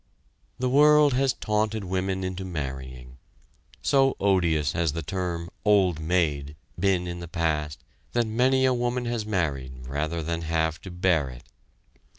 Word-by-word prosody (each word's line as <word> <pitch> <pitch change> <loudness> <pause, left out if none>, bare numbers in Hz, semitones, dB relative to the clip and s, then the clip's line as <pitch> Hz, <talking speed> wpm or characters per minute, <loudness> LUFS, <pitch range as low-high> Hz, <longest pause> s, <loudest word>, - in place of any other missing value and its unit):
The 125 0 -1
world 150 +1 +5
has 135 +1 +2
taunted 105 0 -1
women 95 0 -2
into 95 0 -4
marrying. 65 -6 -6 0.6
So 135 -1 +3
odious 85 -7 +2
has 85 -3 0
the 85 0 -4
term 85 0 -3
"old 95 -6 +3
maid" 75 -4 0 0.2
been 95 -1 +2
in 85 0 -5
the 85 - -7
past 75 -3 -2 0.3
that 120 -1 +2
many 130 +4 +2
a 130 - +3
woman 120 0 -1
has 120 -3 -2
married 70 -10 -2
rather 75 +5 -2
than 85 +1 -2
have 80 -1 -1
to 95 - -9
bear 90 -5 +1
it. 60 0 -11
90 Hz, 150 wpm, -26 LUFS, 75-110 Hz, 0.6 s, world